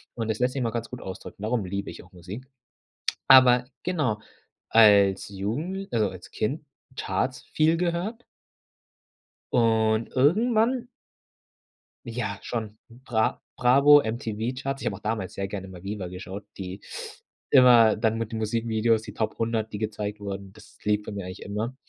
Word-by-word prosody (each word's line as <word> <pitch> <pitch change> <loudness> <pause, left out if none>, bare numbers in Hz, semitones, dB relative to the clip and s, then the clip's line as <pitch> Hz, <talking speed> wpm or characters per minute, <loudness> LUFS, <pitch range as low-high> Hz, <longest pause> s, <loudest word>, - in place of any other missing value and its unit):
Und 115 -2 -3
das 110 +1 -1
lässt 125 +1 +1
sich 135 - -2
mal 115 -2 0
ganz 115 -1 -4
gut 125 - -8
ausdrücken, 95 +1 -9
darum 110 -1 0
liebe 100 +2 -4
ich - - -11
auch 90 - -20
Musik. 95 +9 -9 0.8
Aber 125 -2 +7 0.2
genau, 150 -12 0 0.5
als 100 -4 +5
Jugendl 145 - -3
also, 110 -3 +2
als 90 -1 -11
Kind, 145 +8 -2 0.3
Charts 130 0 -2
viel 160 +2 +2
gehört 180 +7 -2 1.3
und 110 -1 +2
irgendwann 225 - +3 1.2
Ja, 110 -4 -4
schon, 110 -3 -5
Bra 115 -2 -1 0.2
Bravo, 140 +4 +7
MTV-Charts. 120 +4 -3
Ich - - -6
habe 100 - -1
auch - - -11
damals 105 -4 -3
sehr 100 - -3
gerne 95 -1 -5
mal 90 -1 -11
VIVA 100 -2 -4
geschaut, 95 +3 -8
die 95 0 -6 0.7
immer 120 -4 +7
dann 110 0 +1
mit 115 0 -3
den 110 - -3
Musikvideos, 115 0 +1
die - - -9
Top 110 -1 -2
100, 110 -1 -1
die 105 - -4
gezeigt 105 -1 -3
wurden. 100 -1 -6
Das - - -17
lief 105 0 +1
bei - - -7
mir 100 -2 -5
eigentlich 90 +1 -8
immer. 110 +5 -4
110 Hz, 155 wpm, -26 LUFS, 100-125 Hz, 1.3 s, Aber